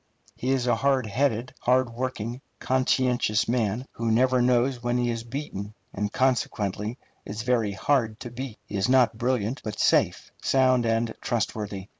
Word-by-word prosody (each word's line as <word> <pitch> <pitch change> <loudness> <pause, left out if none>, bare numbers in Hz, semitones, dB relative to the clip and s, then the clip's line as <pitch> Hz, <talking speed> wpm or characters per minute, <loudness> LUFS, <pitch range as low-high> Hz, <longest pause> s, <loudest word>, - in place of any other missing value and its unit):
He 130 - -3
is 130 -2 +1
a 125 - +2
hard 135 -3 +2
headed, 120 +2 0
hard 125 0 +2
working, 120 0 -4 0.2
conscientious 130 -4 +1
man, 115 0 0
who 115 0 -2
never 125 +3 +3
knows 125 +1 +2
when 120 0 0
he 120 -1 +1
is 115 -1 -4
beaten, 115 -5 -6 0.2
and 105 +1 -2
consequently 110 -4 0 0.3
is 105 +2 -5
very 115 -4 +1
hard 115 0 0
to 120 - -6
beat. 125 -2 -6
He 100 - -5
is 95 +5 +1
not 120 -4 +4
brilliant, 125 0 0
but 110 - -5
safe, - - +2
sound, 130 -3 +3
and 115 0 +1
trustworthy. 105 -4 -3
120 Hz, 160 wpm, -26 LUFS, 110-130 Hz, 0.3 s, not